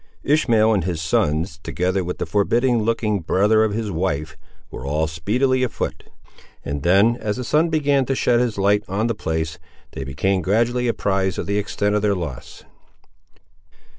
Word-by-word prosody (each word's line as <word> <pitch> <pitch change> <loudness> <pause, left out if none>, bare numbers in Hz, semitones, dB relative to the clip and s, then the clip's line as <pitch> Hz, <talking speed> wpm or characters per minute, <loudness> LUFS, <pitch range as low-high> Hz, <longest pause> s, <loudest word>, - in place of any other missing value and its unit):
Ishmael 115 -7 +3
and 100 -5 +1
his 85 -2 -2
sons, 80 +1 0
together 90 +3 -1
with 90 +1 -4
the - - -3
forbidding 120 +4 +1
looking 110 -2 0
brother 105 +6 +2
of 110 - 0
his 110 -1 -3
wife, 80 -4 -2 0.4
were - - -7
all 75 +3 0
speedily 115 - 0
afoot; 110 -10 -3 0.6
and 70 0 -3
then, 100 - +4
as 105 -3 -3
the 125 - -3
sun 155 +7 +2
began 145 -4 +2
to 135 - 0
shed 120 -2 +2
his 120 -4 -1
light 100 +1 +2
on 100 +4 -1
the 115 - 0
place, 80 -5 -3 0.3
they 70 - -6
became 90 +9 -1
gradually 120 +7 +1
apprised 95 -5 0
of - - -3
the 100 +3 0
extent 105 0 -1
of 105 - +1
their 100 -1 +1
loss. 80 -9 -7
100 Hz, 170 wpm, -21 LUFS, 85-115 Hz, 0.6 s, then